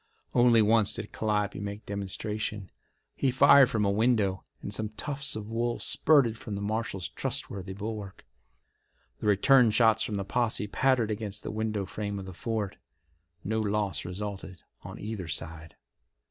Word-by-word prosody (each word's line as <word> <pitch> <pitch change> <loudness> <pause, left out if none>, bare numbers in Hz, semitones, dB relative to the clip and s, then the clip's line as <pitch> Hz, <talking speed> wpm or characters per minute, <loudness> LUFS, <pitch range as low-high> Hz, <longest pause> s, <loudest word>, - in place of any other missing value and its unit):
Only 120 -2 +5
once 110 -1 +3
did - - -6
Calliope 105 -2 -1
make 100 +1 -6
demonstration. 105 0 -4 0.4
He 135 - +1
fired 135 0 +7
from 110 -2 0
a 100 - +2
window, 105 -3 +1 0.2
and 100 - -4
some 110 +1 0
tufts 140 +6 -3
of 105 -1 -5
wool 120 +1 -1
spurted 130 -8 +3
from 105 - -5
the 100 - -4
marshal's 105 -4 -2
trustworthy 100 -8 -3
bulwark. 105 -1 -6 0.9
The - - -3
return 120 +5 +5
shots 110 0 +4
from 105 - -2
the 100 -1 -2
posse 115 -1 0
pattered 120 +1 +1
against 105 -1 -3
the - - -4
window 110 -2 -2
frame 100 +1 -4
of 95 - -6
the 95 - -8
fort. 110 0 -3 0.7
No 110 +2 -1
loss 100 -6 0
resulted 95 -1 -6 0.2
on - - -9
either 105 -4 -5
side. 80 +1 -5
105 Hz, 155 wpm, -28 LUFS, 100-115 Hz, 0.9 s, fired